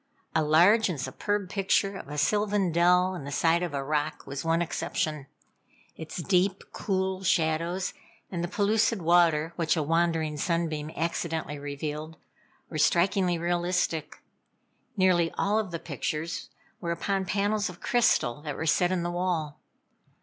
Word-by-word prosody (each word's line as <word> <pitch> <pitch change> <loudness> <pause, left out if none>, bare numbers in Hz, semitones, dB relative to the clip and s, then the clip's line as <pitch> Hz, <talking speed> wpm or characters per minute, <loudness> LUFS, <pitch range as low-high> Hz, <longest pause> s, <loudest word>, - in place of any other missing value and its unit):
A - - +3
large 175 +9 +5
and 165 -6 -3
superb 200 +10 -2
picture 195 +1 +1
of 190 - -8
a 150 +1 -6
sylvan 205 +3 +1
dell 180 +2 +4
in 175 - -6
the 140 - -6
side 165 +5 +2
of 170 -5 -3
a 135 - -2
rock, 150 +1 -2
was 140 +1 -5
one 165 0 +2
exception. 155 -3 -2 0.7
Its 160 +2 -6
deep, 190 +2 +1
cool 190 -1 -1
shadows, 170 +1 0 0.4
and 175 -2 -3
the - - -1
pellucid 210 +3 +1
water, 165 -1 +3
which 165 -1 +1
a 155 - +1
wandering 165 -1 +1
sunbeam 160 -2 -1
accidentally 160 -2 -2
revealed, 150 +2 -5 0.5
were 155 - -5
strikingly 180 +2 +3
realistic. 175 -1 -1 0.7
Nearly 180 -3 +3
all 210 +2 +2
of 215 -4 -3
the 170 - -4
pictures 160 +1 -4 0.3
were 170 - -4
upon 190 +3 -1
panels 205 +2 0
of 180 - -11
crystal 150 - +2
that 145 -2 -5
were 160 - -4
set 175 +3 +3
in 180 -2 0
the 175 - -2
wall. 175 -4 -2
170 Hz, 150 wpm, -27 LUFS, 155-185 Hz, 0.7 s, large